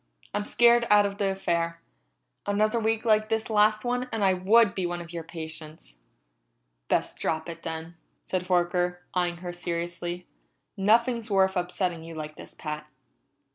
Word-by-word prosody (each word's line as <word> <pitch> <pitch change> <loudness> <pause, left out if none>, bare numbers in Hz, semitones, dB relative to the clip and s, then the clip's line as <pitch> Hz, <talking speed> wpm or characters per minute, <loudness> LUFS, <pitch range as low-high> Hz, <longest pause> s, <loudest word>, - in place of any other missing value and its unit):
I'm 205 - -1
scared 235 +1 +5
out 205 0 +6
of 200 0 -4
the 200 -1 +2
affair. 170 -3 -1 0.7
Another 215 +3 +2
week 225 +1 0
like 215 -1 +3
this 225 0 -1
last 215 +1 +3
one 245 +1 -1
and 225 -2 -1
I 190 -1 +5
would 200 +3 +4
be 185 -2 -1
one 175 0 -3
of 170 0 -9
your 170 -1 -4
patients." 160 - -8 0.9
"Best - - 0
drop 160 0 -1
it, 165 -1 -7
then," 160 +1 -6 0.3
said 185 -1 -2
Horker, 180 0 +1
eyeing 175 -1 0
her 175 - -4
seriously. 175 0 -4 0.5
"Nothing's 230 +3 +2
worth 190 -1 +3
upsetting 180 -2 -1
yourself 165 0 -9
like 155 0 -6
this, - - -11
Pat." 150 -1 -6
180 Hz, 160 wpm, -27 LUFS, 170-215 Hz, 0.9 s, out